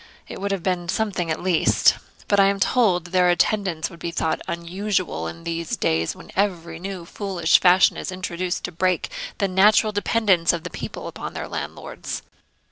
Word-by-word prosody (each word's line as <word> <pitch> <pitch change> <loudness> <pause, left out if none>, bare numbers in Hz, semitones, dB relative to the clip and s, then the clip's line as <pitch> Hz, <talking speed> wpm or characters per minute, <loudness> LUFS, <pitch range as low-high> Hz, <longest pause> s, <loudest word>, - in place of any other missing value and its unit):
It - - -8
would 200 - -1
have 195 -4 -2
been 175 -2 -1
something, 190 -5 -1
at 160 - -2
least; 180 -3 +4 0.3
but 200 - +3
I 195 - +7
am 200 0 0
told 195 -7 +2
their 180 0 +3
attendance 175 -2 +1
would 170 - -13
be 170 - -3
thought 160 -1 -1
unusual 175 - -2
in 85 0 -8
these 165 -1 -3
days, 80 +1 0
when - - -13
every 170 -4 -1
new 190 0 -5
and 170 - -13
foolish 185 -6 +2
fashion 185 +1 +5
is - - -4
introduced 185 -1 -3
to - - -4
break 185 - 0 0.3
the 200 - +1
natural 210 +3 +4
dependence 205 -5 +2
of 170 -2 -3
the - - -6
people - - -6
upon - - -7
their - - -4
landlords.' - - -6
180 Hz, 185 wpm, -23 LUFS, 170-195 Hz, 0.3 s, I